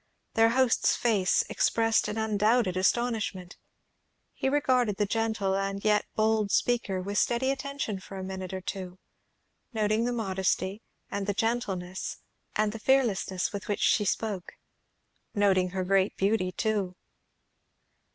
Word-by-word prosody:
Their 225 Hz, 0 st, +5 dB
host's 255 Hz, 0 st, +3 dB
face 205 Hz, -6 st, +2 dB
expressed 225 Hz, -1 st, +2 dB
an 210 Hz, -, -4 dB
undoubted 215 Hz, -1 st, +2 dB
astonishment. 200 Hz, -2 st, -1 dB, 0.8 s
He 265 Hz, -, -1 dB
regarded 255 Hz, -7 st, +2 dB
the 210 Hz, -, +2 dB
gentle 220 Hz, -2 st, 0 dB
and 195 Hz, +1 st, -2 dB
yet 210 Hz, -1 st, +3 dB
bold 215 Hz, -1 st, +2 dB
speaker 215 Hz, -4 st, +1 dB
with 200 Hz, +2 st, -1 dB
steady 260 Hz, +3 st, +1 dB
attention 275 Hz, -7 st, -3 dB
for 195 Hz, +1 st, -10 dB
a 190 Hz, -, -5 dB
minute 190 Hz, 0 st, -5 dB
or 190 Hz, 0 st, -4 dB
two, 185 Hz, -1 st, -6 dB, 0.8 s
noting 215 Hz, +1 st, +1 dB
the 245 Hz, -, 0 dB
modesty, 190 Hz, -2 st, -1 dB, 0.3 s
and 200 Hz, 0 st, -3 dB
the 205 Hz, -, 0 dB
gentleness, 195 Hz, -6 st, -2 dB, 0.4 s
and 215 Hz, 0 st, +2 dB
the 225 Hz, -, -7 dB
fearlessness 215 Hz, -8 st, +1 dB
with 200 Hz, -2 st, -5 dB
which 205 Hz, -, -2 dB
she 210 Hz, -, +3 dB
spoke. 200 Hz, -2 st, -2 dB, 0.8 s
Noting 190 Hz, -3 st, +3 dB
her 185 Hz, +1 st, -2 dB
great 195 Hz, +1 st, +2 dB
beauty 195 Hz, -2 st, +1 dB
too. 200 Hz, -2 st, -1 dB
210 Hz, 135 wpm, -28 LUFS, 190-225 Hz, 0.8 s, Their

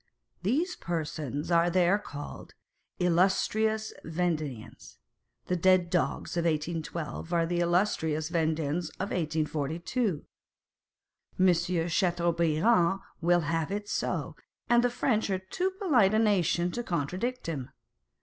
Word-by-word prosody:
These 305 Hz, -, 0 dB
persons 155 Hz, -2 st, -3 dB
are 170 Hz, 0 st, +4 dB
there 180 Hz, +3 st, +3 dB
called 145 Hz, -7 st, -9 dB, 0.2 s
" -, -, -46 dB
Illustrious 215 Hz, +5 st, +2 dB
Vendeans." 155 Hz, -8 st, -3 dB, 0.5 s
The 180 Hz, -, 0 dB
dead 180 Hz, 0 st, +3 dB
dogs 175 Hz, -1 st, -1 dB
of 170 Hz, -1 st, 0 dB
1812 160 Hz, 0 st, -3 dB
are 170 Hz, -1 st, +2 dB
the 175 Hz, +1 st, -1 dB
illustrious 170 Hz, -3 st, +1 dB
Vendeans 160 Hz, -1 st, 0 dB
of 195 Hz, +2 st, -3 dB
1824. 160 Hz, -, -1 dB, 1.2 s
Monsieur 175 Hz, -2 st, +2 dB
Chateaubriand 170 Hz, +2 st, +2 dB, 0.2 s
will 175 Hz, +1 st, +3 dB
have 165 Hz, +1 st, -1 dB
it 205 Hz, +1 st, -3 dB
so, -, -, -2 dB, 0.3 s
and 240 Hz, 0 st, +4 dB
the 245 Hz, -, +3 dB
French 230 Hz, -3 st, 0 dB
are 190 Hz, -, +1 dB
too 190 Hz, -, -2 dB
polite 245 Hz, -, +4 dB
a -, -, +4 dB
nation 180 Hz, -5 st, +2 dB
to 240 Hz, -, -3 dB
contradict 190 Hz, -, -2 dB
him. 140 Hz, -6 st, -4 dB
175 Hz, 120 wpm, -29 LUFS, 160-195 Hz, 1.2 s, are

